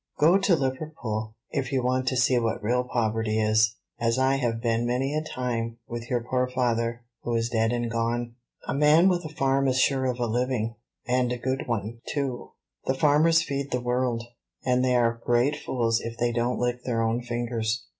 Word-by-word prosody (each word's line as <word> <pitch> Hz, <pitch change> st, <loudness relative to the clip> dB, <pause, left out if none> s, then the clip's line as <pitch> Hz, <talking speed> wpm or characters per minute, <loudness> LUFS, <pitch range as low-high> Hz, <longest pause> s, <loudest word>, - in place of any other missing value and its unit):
Go 170 Hz, +6 st, +5 dB
to 195 Hz, -2 st, +3 dB
Liverpool, 130 Hz, -6 st, -3 dB, 0.2 s
if 135 Hz, -1 st, -2 dB
you 130 Hz, -2 st, +1 dB
want 130 Hz, +1 st, 0 dB
to 130 Hz, -, +1 dB
see 125 Hz, +1 st, +3 dB
what 115 Hz, -2 st, -2 dB
real 125 Hz, +3 st, +1 dB
poverty 110 Hz, -3 st, 0 dB
is, 110 Hz, +1 st, +3 dB, 0.2 s
as 115 Hz, +1 st, +1 dB
I 130 Hz, +1 st, +3 dB
have 120 Hz, -4 st, -1 dB
been 115 Hz, 0 st, 0 dB
many 130 Hz, +4 st, 0 dB
a 155 Hz, -, 0 dB
time 120 Hz, -5 st, -3 dB
with 115 Hz, 0 st, -6 dB
your 120 Hz, -2 st, 0 dB
poor 125 Hz, +1 st, 0 dB
father, 120 Hz, -2 st, -1 dB, 0.2 s
who 120 Hz, -, -2 dB
is 115 Hz, 0 st, 0 dB
dead 115 Hz, 0 st, +2 dB
and 120 Hz, -1 st, -1 dB
gone. 115 Hz, +1 st, -1 dB, 0.3 s
A -, -, -1 dB
man 150 Hz, +6 st, +5 dB
with 175 Hz, -1 st, 0 dB
a -, -, -4 dB
farm 135 Hz, -2 st, +1 dB
is 130 Hz, -1 st, +1 dB
sure 135 Hz, 0 st, +2 dB
of 125 Hz, -1 st, -2 dB
a 120 Hz, -, +1 dB
living, 120 Hz, -1 st, -1 dB, 0.3 s
and 125 Hz, -1 st, +1 dB
a 125 Hz, -, -1 dB
good 130 Hz, +2 st, -2 dB
one, 115 Hz, 0 st, -3 dB
too; 135 Hz, -4 st, -3 dB, 0.3 s
the 130 Hz, -, +1 dB
farmers 155 Hz, +4 st, +4 dB
feed 140 Hz, -2 st, -3 dB
the 125 Hz, -, 0 dB
world, 125 Hz, -1 st, 0 dB, 0.4 s
and 125 Hz, 0 st, +2 dB
they 125 Hz, -1 st, +2 dB
are 115 Hz, -1 st, +2 dB
great 120 Hz, +5 st, +2 dB
fools 115 Hz, -5 st, 0 dB
if 115 Hz, 0 st, -6 dB
they 120 Hz, 0 st, +1 dB
don't 120 Hz, +1 st, 0 dB
lick 125 Hz, 0 st, -1 dB
their 115 Hz, -2 st, 0 dB
own 115 Hz, +2 st, 0 dB
fingers. 120 Hz, -1 st, -2 dB
125 Hz, 200 wpm, -26 LUFS, 115-130 Hz, 0.4 s, Go